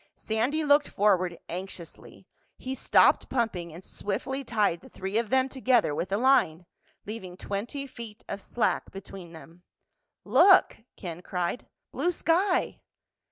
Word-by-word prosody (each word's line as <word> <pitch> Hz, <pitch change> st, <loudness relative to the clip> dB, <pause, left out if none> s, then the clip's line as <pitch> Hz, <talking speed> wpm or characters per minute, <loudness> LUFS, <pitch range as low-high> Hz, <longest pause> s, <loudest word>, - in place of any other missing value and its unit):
Sandy 245 Hz, +8 st, -1 dB
looked 290 Hz, 0 st, +4 dB
forward 185 Hz, -4 st, +2 dB
anxiously. 180 Hz, -1 st, -8 dB, 0.3 s
He 260 Hz, -, -5 dB
stopped -, -, +4 dB
pumping 205 Hz, -9 st, -1 dB
and 170 Hz, +4 st, -11 dB
swiftly 265 Hz, +10 st, -4 dB
tied 210 Hz, -8 st, 0 dB
the -, -, -15 dB
three 195 Hz, +4 st, -2 dB
of 230 Hz, -2 st, -3 dB
them 260 Hz, 0 st, +3 dB
together 255 Hz, -, +2 dB
with 170 Hz, -, -3 dB
the 195 Hz, -, 0 dB
line, 205 Hz, -10 st, +3 dB, 0.4 s
leaving 190 Hz, -4 st, -7 dB
twenty 225 Hz, +9 st, -4 dB
feet 235 Hz, -5 st, -10 dB
of 200 Hz, -, -5 dB
slack 240 Hz, -, -1 dB
between 195 Hz, -3 st, -10 dB
them. 165 Hz, +3 st, -13 dB, 0.6 s
"Look!" 385 Hz, -1 st, +6 dB, 0.2 s
Ken 175 Hz, -2 st, -7 dB
cried. 180 Hz, +5 st, -3 dB, 0.2 s
"Blue 355 Hz, -, 0 dB
sky!" 360 Hz, +3 st, +1 dB
210 Hz, 135 wpm, -28 LUFS, 180-260 Hz, 0.6 s, Look